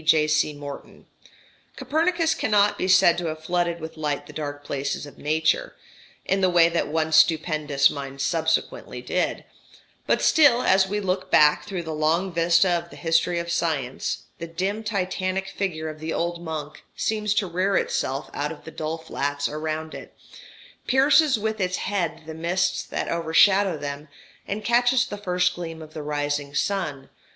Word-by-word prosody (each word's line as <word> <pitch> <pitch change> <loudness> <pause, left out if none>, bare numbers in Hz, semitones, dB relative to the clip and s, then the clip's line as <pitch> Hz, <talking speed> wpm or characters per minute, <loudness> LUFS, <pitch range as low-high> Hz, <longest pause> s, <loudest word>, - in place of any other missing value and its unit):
J.C. 155 -1 +3
Morton): 145 -1 -10 0.7
"Copernicus 330 +1 +1
cannot 210 -1 +2
be 185 - -2
said 185 -2 +5
to 175 - -3
have 155 0 -5
flooded 175 0 0
with 160 0 -8
light 145 -2 -2
the - - -12
dark 145 -1 -5
places 140 0 -3
of 145 - -14
nature 160 - 0 0.5
in 195 0 +1
the 185 - +4
way 170 -1 +5
that 170 0 -1
one 160 +1 -1
stupendous 155 -3 +3
mind 140 -1 -7
subsequently 160 - -1
did - - -1 0.6
but - - +3
still, 280 -6 +5
as 190 0 +4
we 205 +2 -2
look 190 -1 -2
back 150 -3 +5
through 190 -4 -4
the 160 -1 -5
long 165 +5 0
vista 170 +2 +4
of 170 -1 0
the - - -13
history 165 +1 +1
of 170 0 -3
science, 150 -7 -2 0.2
the 170 - -5
dim 190 +6 -3
Titanic 190 -2 -2
figure 180 -5 -3
of 155 0 -7
the 160 +1 -4
old 170 +1 -2
monk 155 -3 -6
seems 210 -1 -1
to 210 - +2
rear 185 +3 0
itself 135 +3 -2
out 150 +2 -2
of 160 - -10
the 160 - -9
dull 155 +1 -4
flats 145 -3 -2
around 155 +1 -4
it, - - -10 0.7
pierces 280 +1 +4
with 220 0 -2
its 185 0 0
head 175 -6 -2
the 160 - -7
mists 170 +3 0
that - - -4
overshadow 170 +3 +3
them, 145 +1 -6 0.4
and 205 +1 -4
catches 245 +2 +3
the - - -6
first 180 -3 +1
gleam 165 -2 -7
of 155 -1 -11
the 155 - -6
rising 145 -1 -2
sun 150 -9 -2
170 Hz, 170 wpm, -24 LUFS, 155-190 Hz, 0.7 s, said